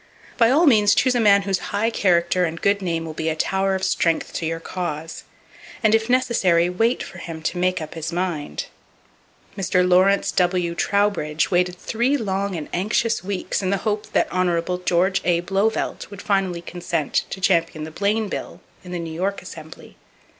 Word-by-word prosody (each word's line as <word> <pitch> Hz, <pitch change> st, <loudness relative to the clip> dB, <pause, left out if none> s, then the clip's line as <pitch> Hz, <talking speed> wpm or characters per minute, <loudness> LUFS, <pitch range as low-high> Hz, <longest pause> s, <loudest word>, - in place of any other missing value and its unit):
By 230 Hz, -2 st, +4 dB
all 305 Hz, +7 st, +4 dB
means 215 Hz, -7 st, +5 dB
choose 255 Hz, -1 st, +3 dB
a 245 Hz, -, +1 dB
man 200 Hz, -3 st, +5 dB
whose 195 Hz, -2 st, 0 dB
high 215 Hz, +3 st, 0 dB
character 180 Hz, -3 st, +2 dB
and 165 Hz, -1 st, -2 dB
good 200 Hz, +2 st, +1 dB
name 165 Hz, -3 st, -2 dB
will 160 Hz, -, -6 dB
be 160 Hz, +1 st, -2 dB
a 155 Hz, -, -1 dB
tower 190 Hz, +4 st, 0 dB
of 190 Hz, -, -4 dB
strength 165 Hz, -3 st, 0 dB
to 165 Hz, -, -2 dB
your 165 Hz, 0 st, -3 dB
cause; 165 Hz, -2 st, -5 dB, 0.6 s
and 215 Hz, -1 st, +4 dB
if 225 Hz, +1 st, +2 dB
necessary, 190 Hz, -9 st, +2 dB
wait 225 Hz, +7 st, +1 dB
for -, -, -10 dB
him 160 Hz, -2 st, -7 dB
to 175 Hz, -, -2 dB
make 185 Hz, +1 st, +1 dB
up 155 Hz, -, -9 dB
his 160 Hz, 0 st, -5 dB
mind. 170 Hz, -4 st, -3 dB, 0.9 s
Mr. 180 Hz, -2 st, +1 dB
Lawrence 185 Hz, +2 st, +4 dB
W. 180 Hz, -1 st, +1 dB
Trowbridge 170 Hz, -4 st, 0 dB
waited 180 Hz, 0 st, +2 dB
three 240 Hz, +9 st, 0 dB
long 200 Hz, -4 st, -2 dB
and 155 Hz, -3 st, -5 dB
anxious 215 Hz, +4 st, 0 dB
weeks 195 Hz, +1 st, -2 dB
in 185 Hz, -, -1 dB
the 200 Hz, -, +1 dB
hope 210 Hz, -1 st, -2 dB
that -, -, +2 dB
Hon. 180 Hz, -1 st, 0 dB
George 185 Hz, +2 st, +2 dB
A. 170 Hz, -1 st, +2 dB
Blauvelt 195 Hz, +5 st, -1 dB
would 200 Hz, -1 st, -10 dB
finally 190 Hz, -4 st, 0 dB
consent 170 Hz, -4 st, -2 dB
to -, -, -6 dB
champion 165 Hz, -4 st, +1 dB
the 160 Hz, -, -7 dB
Bayne 205 Hz, +5 st, 0 dB
bill -, -, -6 dB, 0.2 s
in 180 Hz, -, -10 dB
the -, -, -2 dB
New 165 Hz, -1 st, -5 dB
York 195 Hz, +4 st, -2 dB
Assembly. -, -, -11 dB
185 Hz, 185 wpm, -22 LUFS, 170-200 Hz, 0.9 s, means